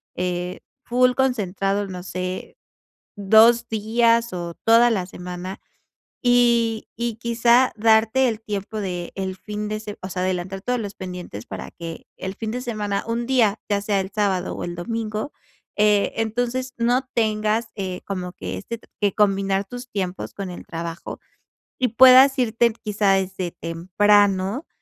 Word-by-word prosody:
eh, 180 0 -3 0.2
full 250 +1 +3
concentrado, 205 -6 0
no 180 -2 -7
sé, 185 0 -5 0.6
2 225 +4 +5
días 230 +1 +2
o 170 -1 -5
toda 230 +1 +6
la 195 -6 0
semana, 180 +1 -7 0.6
y 235 -3 +3
y 235 -1 -2
quizá 235 +2 +3
darte 225 +4 +4
el 220 -2 -2
tiempo 210 0 -4
del 185 0 -4
fin 210 +1 -5
de 215 0 -2
se 210 -1 -8
o 185 - -6
sea, 180 0 -3
adelantar 185 +1 -2
todos 250 +4 -1
los 205 -3 -5
pendientes 180 - -7
para - - -7
que 165 -1 -8
el 190 +1 -5
fin 220 +1 -4
de 245 - -3
semana, 210 -5 -2
un 230 +1 -1
día, 235 -5 +3
ya 205 -1 +2
sea 200 -1 +1
el 190 +1 -7
sábado 195 -3 0
o - - -4
el 175 0 -5
domingo, 215 - -3 0.5
eh, 210 -1 +3
entonces 245 +3 -1
no 245 +3 +1
tengas, 215 0 +1
eh, 185 -3 -4
como 180 -2 -4
que 95 - -6
este 230 - -6
t - - -22
que 205 -2 +1
combinar 195 -1 +2
tus 245 +5 -9
tiempos 190 -3 -4
con 195 -2 -5
el 175 - -9
trabajo 165 0 -6 0.6
y 255 - +2
puedas 260 +2 +8
irte 235 -1 +2
quizá 205 -2 +2
desde 190 -1 -1
temprano, 195 - +1
210 Hz, 155 wpm, -23 LUFS, 185-235 Hz, 0.6 s, puedas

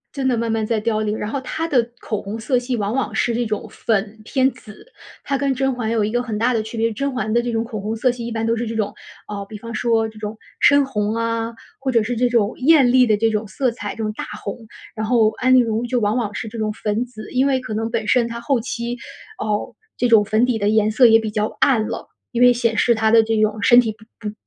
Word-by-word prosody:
真 265 -2 0
的 245 - +1
慢 230 0 -1
慢 220 -1 0
在 220 0 0
凋 215 0 0
零。 215 0 -1
然 210 - -3
后 270 +3 -3
她 320 +5 -3
的 245 -6 +1
口 215 -2 -3
红 210 +3 -6
色 250 +3 +1
系 245 0 -2
往 210 +2 -2
往 270 - -1
是 235 - 0
这 240 +1 0
种 215 -2 -3
粉 215 -1 -1
偏 260 +4 +2
紫， 220 - -14 0.4
她 275 - 0
跟 275 0 0
甄 270 0 0
嬛 225 -2 -2
有 225 -2 +1
一 215 - -2
个 245 +1 0
很 225 -4 -4
大 235 +4 +2
的 225 -2 0
区 220 +2 -8
别。 225 0 +1
甄 275 +6 -2
嬛 215 -3 -2
的 240 - +3
这 240 0 -3
种 225 0 -1
口 220 -3 -6
红 215 +2 -3
色 250 +2 +2
系 240 -1 -7
一 235 - -5
般 225 0 -2
都 230 - +2
是 235 +1 -2
这 225 0 -4
种， 205 -2 -1 0.3
呃， 200 -1 -5
比 215 - -7
方 230 +2 -8
说 225 -2 +1
这 220 0 -13
种 215 0 -6 0.2
深 285 -1 +6
红 210 -5 -1
啊， 230 0 -2 0.3
或 265 -1 -1
者 230 -2 +3
是 235 +3 -2
这 245 +1 +2
种 230 -3 +2
艳 270 -3 +5
丽 255 -1 +6
的 215 -3 +2
这 225 +2 +2
种 215 0 -1
色 250 +5 -1
彩， 205 -3 -6
这 - - -15
种 215 - -2
大 - - -6 0.2
红。 200 - -5 0.4
然 220 -1 -2
后 220 -2 +3
安 255 +3 +1
陵 255 -2 +6
容 225 +1 -1
就 245 0 0
往 210 0 +1
往 225 -5 -1
是 220 - -5
这 225 +2 -8
种 215 -1 -1
粉 210 +1 -2
紫， 220 -3 -11
因 260 +1 +3
为 270 -2 +2
可 250 -4 -6
能 225 +1 -2
本 225 -2 -2
身 245 +2 +3
她 235 0 -5
后 255 0 0
期 240 0 -4 0.4
哦， 210 -1 -2 0.2
这 245 - +2
种 225 -3 +6
粉 215 +3 +2
底 250 -2 0
的 205 -1 +1
颜 215 0 +3
色 240 +3 +6
也 225 0 +6
比 220 -1 -3
较 210 0 -2
暗 225 -6 +3
了， - - -5 0.2
因 240 - -1
为 245 0 +7
显 230 -2 0
示 235 - +3
她 220 0 +2
的 230 0 +7
这 225 0 -1
种 215 0 0
身 240 +4 +7
体 225 -3 -2
不 220 0 -9
不 - - -9
230 Hz, 300 characters per minute, -20 LUFS, 215-245 Hz, 0.4 s, 为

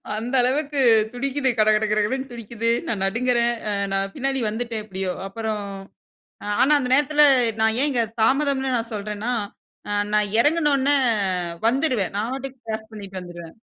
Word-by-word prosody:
அந்த 235 +4 -4
அளவுக்கு 280 +3 0 0.3
துடிக்குது, 270 +1 -1
கடகட 215 0 +4
கடகடன்னு 235 +6 0
துடிக்குது, 230 0 -3 0.2
நான் 200 -4 -1
நடுங்கறேன். 235 +3 +1 0.2
அ 205 - 0 0.2
நான் 195 0 -1
பின்னாடி 270 0 -1
வந்துட்டேன் 225 0 -4
எப்படியோ. 190 -2 -3 0.2
அப்புறம் 215 0 -4 1.0
ஆனா, 270 +4 +4
அந்த 255 -3 -2
நேரத்தில 295 +2 +3 0.4
நான் 220 0 +3
ஏன் 295 - +2
இங்க 245 -4 +1 0.2
தாமதம்னு 270 +1 +2
நான் 230 0 -3
சொல்றேன்னா, 210 +3 -3 0.8
நான் 210 -1 +1
இறங்குன 300 +4 +3
உடனே 275 +2 +2 0.7
வந்துருவேன். 255 - +1
நான் 220 +4 -1
பாட்டுக்கு 265 0 -6
கிராஸ் 220 0 -5
பண்ணிட்டு 195 -3 -7
வந்துருவேன். 175 -2 -10
235 Hz, 140 wpm, -23 LUFS, 210-270 Hz, 1.0 s, கடகட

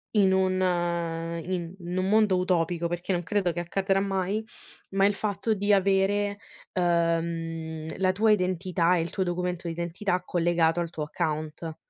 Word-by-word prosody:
in 195 -2 +5
un, 185 0 +2
ehm 170 -2 -1
in 175 -1 -3
in 175 +1 -5
un 185 +1 +1
mondo 210 -3 +4
utopico, 170 -2 +1
perché 175 +2 -3
non 175 0 -1
credo 190 -2 0
che 175 - -3
accadrà 195 +2 0
mai, 195 +2 -1 0.5
ma 195 +1 +4
il 205 - 0
fatto 210 +1 -1
di 205 +1 +2
avere, 200 +1 +2 0.4
uhm, 165 -2 -1
la 185 -1 +3
tua 215 +3 +2
identità 180 -2 +2
e 165 - +1
il 165 - -3
tuo 190 - -1
documento 175 -1 -2
d'identità 175 +2 -2
collegato 170 -1 +2
al 170 0 -4
tuo 155 - -6
account. 155 0 -3
180 Hz, 160 wpm, -27 LUFS, 170-195 Hz, 0.5 s, in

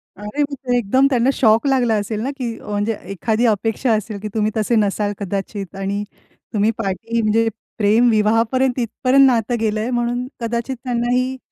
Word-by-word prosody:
अरे 210 +9 -4
म्हणजे 265 -3 -2
एकदम 260 +5 +3
त्यांना 250 0 +2
शॉक 225 +2 +3
लागला 250 -4 +2
असेल 210 +1 -2
ना, 270 - -1
की 235 -3 -4
म्हणजे 210 +1 -2 0.2
एखादी 220 +5 0
अपेक्षा 225 +2 +1
असेल, 215 -1 -2
की 215 - -5
तुम्ही 215 0 +1
तसे 220 +2 +1
नसाल 205 -1 +1
कदाचित 195 0 -4
आणि 200 +1 -2 0.5
तुम्ही 210 +2 +2
पाठी 225 +4 -2
म्हणजे 225 +1 +2 0.3
प्रेम 220 +3 +4
विवाहापर्यंत 230 +4 +2
तिथपर्यंत 255 +3 +3
नातं 240 -1 +1
गेलंय 220 +1 -1
म्हणून 245 +1 -1
कदाचित 235 +3 -2
त्यांनाही 250 +1 0
225 Hz, 155 wpm, -20 LUFS, 210-245 Hz, 0.5 s, प्रेम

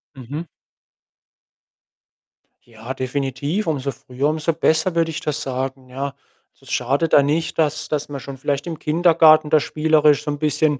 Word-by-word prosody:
Mhm. 140 +6 -7 2.2
Ja, 115 +2 -8
definitiv, 140 +8 -2
umso 140 -3 -1
früher, 130 +2 -3
umso 155 +1 0
besser, 160 +2 +1
würde 165 -1 +2
ich 155 - -5
das 150 0 -2
sagen, 130 0 -4
ja? 135 +2 -4 0.4
Also, - - -29
es - - -10
schadet 140 +6 0
da - - +8
nicht, 155 +4 -1
dass 155 -1 0
dass 150 -1 -3
man 140 -1 -5
schon 135 0 -8
vielleicht 140 +3 -2
im 165 -2 -5
Kindergarten 155 -1 +4
da 155 0 +5
spielerisch 150 -1 +2
so 150 - -2
‘n 145 - -5
bisschen 150 -1 +1
145 Hz, 160 wpm, -21 LUFS, 135-155 Hz, 2.2 s, da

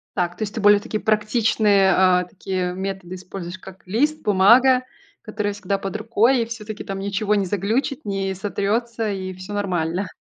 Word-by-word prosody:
Так, 175 -2 -1
то - - -7
есть 210 -1 -3
ты 225 - -3
более 205 0 +6
такие 215 +1 -4
практичные, 215 -2 +3
а, 180 -1 +4
такие 185 0 -3
методы 190 -1 -5
используешь, 185 -1 -8
как 190 0 -13
лист, 295 +10 0
бумага, 245 +6 +5 0.4
которая 210 -1 -3
всегда 200 -1 -2
под 195 +2 -4
рукой 230 +3 +2
и - - -2
всё-таки 215 -2 -7
там 195 0 -5
ничего 200 +1 0
не 200 -2 +1
заглючит, 225 - -1
не 195 -1 -2
сотрется 215 +3 -2
и 185 -2 -4
всё 185 +3 -8
нормально. 180 -2 -1
200 Hz, 170 wpm, -22 LUFS, 190-215 Hz, 0.4 s, более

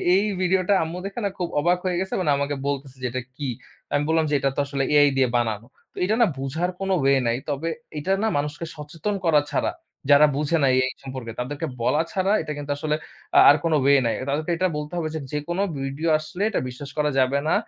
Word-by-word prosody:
এই 195 - +4 0.2
ভিডিওটা 185 +1 +2
আম্মু 165 +2 -5
দেখে 200 +4 -5
না - - +1
খুব 175 - -1
অবাক 175 +4 +3
হয়ে 180 -1 0
গেছে 190 0 -3
মানে 150 -5 +2
আমাকে 140 +1 -1
বলতেছে 135 -2 -4
যে, - - -3
"এটা 130 +1 -2 0.2
কী?" 145 - -3 0.5
আমি 145 0 +2
বললাম 160 0 +3
যে, - - -2
"এটা 135 - +1
তো - - -2
আসলে 140 -1 -2
AI 145 -1 +6
দিয়ে 130 -1 +4
বানানো।" 110 -2 -1 0.3
তো - - -23
এটা 215 +4 +1
না - - +7
বুঝার 145 +7 -2
কোন 195 0 -3
ওয়ে 135 0 +4
নাই। 115 - +2
তবে 145 +3 -2 0.3
এটা 175 +6 -2
না - - +3
মানুষকে 150 +3 -3
সচেতন 160 +7 -4
করা 160 -3 +5
ছাড়া, - - 0 0.4
যারা 145 +1 +8
বুঝে 150 +3 +1
না - - +5
AI 130 0 +2
সম্পর্কে 130 -4 -6
তাদেরকে 145 +6 -3
বলা 150 +6 +2
ছাড়া 195 -1 +1
এটা 155 -1 -5
কিন্তু 145 0 -5
আসলে 150 +1 -1 0.4
আ - - +10
আর 145 - +8
কোন 165 -1 +1
ওয়ে 140 +1 +6
নাই। 115 - +1 0.2
তাদেরকে 155 +4 -1
এটা 185 +2 +2
বলতে 150 +1 -6
হবে 160 -2 -1
যে - - -2
যেকোনো 160 +5 -2 0.2
ভিডিও 135 +4 -3
আসলে 155 +4 -8
এটা 215 - 0
বিশ্বাস 125 +3 -8
করা 150 0 +2
যাবে 130 +2 +3
না। - - +3
150 Hz, 225 wpm, -24 LUFS, 140-170 Hz, 0.5 s, আ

